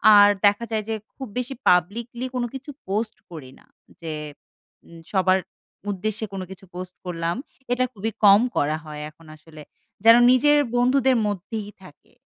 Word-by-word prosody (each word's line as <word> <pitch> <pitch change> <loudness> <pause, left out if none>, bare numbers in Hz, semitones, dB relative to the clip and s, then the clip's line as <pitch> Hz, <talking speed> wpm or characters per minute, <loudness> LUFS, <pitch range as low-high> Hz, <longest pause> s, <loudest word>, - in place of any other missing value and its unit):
আর 205 0 +9 0.2
দেখা 205 +3 +3
যায় 215 -1 -1
যে 220 - 0 0.2
খুব 265 -2 -7
বেশি 250 +2 -2
পাবলিকলি 230 +8 +1
কোন 245 - 0
কিছু 270 +2 -8 0.2
পোস্ট 215 +3 -2 0.2
করি 140 -6 -9
না। - - -23 0.4
যে 160 -2 -4 0.7
উম 165 0 -13
সবার 190 -1 +3 0.5
উদ্দেশ্যে 215 +3 -3
কোন 190 - -4
কিছু 190 0 -11
পোস্ট 180 0 -7
করলাম। 170 -1 -2 0.4
এটা 250 +1 +2
খুবই 220 +2 -3
কম 200 +2 +8 0.2
করা 150 +2 +1
হয় 150 -1 -7
এখন 160 +2 -20
আসলে। 155 0 -14 0.4
যেন 230 +1 +10 0.2
নিজের 295 +4 +5 0.2
বন্ধুদের 255 +1 +3
মধ্যেই 205 +2 -4
থাকে। 150 -5 -17
205 Hz, 155 wpm, -23 LUFS, 170-235 Hz, 0.7 s, যেন